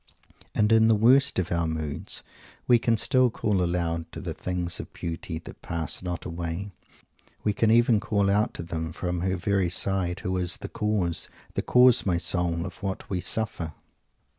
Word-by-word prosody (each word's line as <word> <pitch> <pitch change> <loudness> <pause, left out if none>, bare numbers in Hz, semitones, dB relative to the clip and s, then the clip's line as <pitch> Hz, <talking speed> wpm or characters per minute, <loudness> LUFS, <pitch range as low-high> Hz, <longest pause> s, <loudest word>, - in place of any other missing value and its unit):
And 105 +1 +3
in 110 0 +6
the 115 - +5
worst 130 +6 +4
of 90 -2 -1
our 85 -1 +1
moods 80 -2 -4 0.4
we 120 -1 +5
can 115 0 +2
still 130 +2 +4
call 105 -5 0
aloud 85 -1 -2
to - - -5
the - - -4
things 90 -1 -2
of - - -7
beauty 80 -1 -5
that 80 - -11
pass 85 -3 -2
not 90 -1 -4
away. 85 +3 -4 0.7
We 105 - +1
can 110 +2 +2
even 115 -1 +5
call 100 -2 0
out 100 +2 +1
to - - -4
them 80 -1 -4
from 90 0 -3
her 95 0 0
very 95 -1 +1
side 95 0 +1
who 95 - -2
is 90 -1 -1
"the - - -7
cause," 100 -6 -1 0.2
"the - - -1
cause, 125 -1 +5
my 90 -3 +1
soul," 85 -1 0
of 95 +5 -9
what 95 -1 -4
we 90 -2 -1
suffer. 90 -8 -1
90 Hz, 185 wpm, -26 LUFS, 85-105 Hz, 0.7 s, in